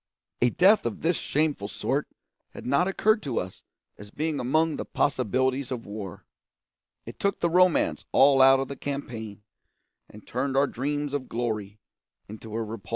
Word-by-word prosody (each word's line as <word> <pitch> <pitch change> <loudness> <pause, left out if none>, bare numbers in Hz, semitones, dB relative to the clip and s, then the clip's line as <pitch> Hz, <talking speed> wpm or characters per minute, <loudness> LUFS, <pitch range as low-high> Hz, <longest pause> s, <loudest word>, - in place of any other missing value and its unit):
A 125 - +5
death 190 - +4
of 115 - -6
this 170 +2 +2
shameful 145 -9 -1
sort - - -2 0.5
had - - -9
not 140 +8 +2
occurred 215 +3 +2
to 135 -8 -2
us 90 0 -7 0.4
as 105 0 -10
being 155 +5 -2
among 155 +5 +1
the - - -3
possibilities 130 0 0
of 125 -3 -5
war. 100 -3 -8 0.8
It - - -10
took 200 -1 0
the 170 - 0
romance 180 0 +3
all 135 0 +5
out 135 0 +7
of 135 - -2
the 140 - -6
campaign, 115 -7 -6 0.7
and 105 - -14
turned 135 +2 -2
our 140 - +5
dreams 145 +2 -3
of 140 -3 -3
glory 110 -4 -3 0.5
into 110 +1 -10
a 115 - -1
repulsive 110 +1 -6
nightmare. 95 0 -18
130 Hz, 170 wpm, -26 LUFS, 110-150 Hz, 0.8 s, out